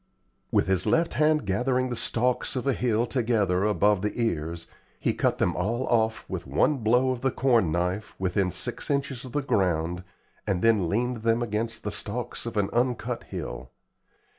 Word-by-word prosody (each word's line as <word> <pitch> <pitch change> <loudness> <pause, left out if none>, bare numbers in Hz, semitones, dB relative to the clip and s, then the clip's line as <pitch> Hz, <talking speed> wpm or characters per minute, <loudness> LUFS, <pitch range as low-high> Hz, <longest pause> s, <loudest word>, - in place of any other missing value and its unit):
With - - +3
his 95 -2 +1
left 165 +1 +2
hand 155 0 +2
gathering 125 +6 0
the 120 - -2
stalks 125 +3 0
of 125 - -2
a 135 - +2
hill 120 -1 +1
together 110 -7 +1
above 105 -2 +3
the 105 +4 -3
ears, 85 -6 -2 0.3
he - - +1
cut - - +1
them - - +1
all 115 +8 -1
olf 110 -1 +1
with - - -5
one 150 - +2
blow 125 +3 +2
of 125 -2 -4
the 135 - +2
corn 120 -10 +2
knife 90 +5 -2
within 95 0 0
six - - -2
inches 140 -3 -1
of 130 - -8
the 145 -1 0
ground, 90 - 0 0.4
and 95 -3 0
then 110 -7 +3
leaned 125 +5 0
them 115 +1 +1
against 115 +1 -2
the 105 - -2
stalks 120 +3 -4
of 115 - -5
an 100 -1 +1
uncut 120 0 -1
hill. - - -6
115 Hz, 180 wpm, -26 LUFS, 95-125 Hz, 0.4 s, With